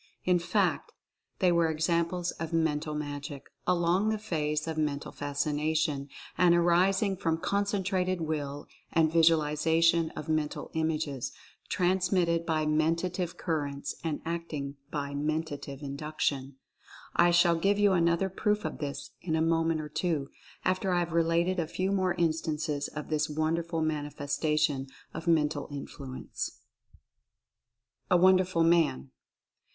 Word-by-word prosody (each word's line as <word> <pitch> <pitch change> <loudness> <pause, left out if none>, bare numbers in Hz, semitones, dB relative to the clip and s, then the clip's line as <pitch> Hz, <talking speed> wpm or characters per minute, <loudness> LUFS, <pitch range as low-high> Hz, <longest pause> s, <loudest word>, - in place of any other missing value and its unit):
In 180 -1 +4
fact, 180 +2 0 0.4
they 185 -2 +3
were 170 -1 +3
examples 170 +2 0
of 160 0 -4
Mental 155 -1 0
Magic, 145 -1 -5 0.2
along 180 +3 +2
the 220 - 0
phase 155 -7 -2
of 160 - -2
Mental 150 -2 -2
Fascination, 145 0 -1 0.3
and 175 -1 +6
arising 185 +4 +3
from 165 -4 0
Concentrated 190 -1 0
Will, 145 -3 -3 0.3
and 160 -1 +3
Visualization 165 +1 +3
of 155 - -6
Mental 155 -1 -2
Images, 155 -5 -1 0.4
transmitted 180 -2 +1
by 155 -2 +1
Mentative 165 +3 0
Currents, 145 -4 -2
and 160 -3 -2
acting 160 -4 -4
by 140 -2 -3
Mentative 145 -1 -3
Induction. 140 -1 -2 0.6
I 175 - +5
shall 175 0 +5
give 195 +5 +2
you 205 -1 +4
another 170 +1 +2
proof 210 0 0
of 155 - -4
this 140 -2 -5
in 160 -3 -1
a - - +1
moment 165 0 +2
or 150 - -7
two, 150 -3 -1 0.4
after 185 +1 +1
I 180 - +2
have 175 -1 0
related 170 +2 +2
a 165 - -1
few 185 +4 -1
more 185 -2 +1
instances 155 -3 -1
of 150 0 -7
this 155 0 0
wonderful 160 +2 -1
mani 150 -2 -1
festation 145 -1 0 0.2
of 165 +1 -7
Mental 150 -3 +2
Influence. 140 -2 -6 1.5
A 180 - +5
WONDERFUL 185 -1 +4
MAN. 160 - +2
160 Hz, 130 wpm, -29 LUFS, 150-175 Hz, 1.5 s, and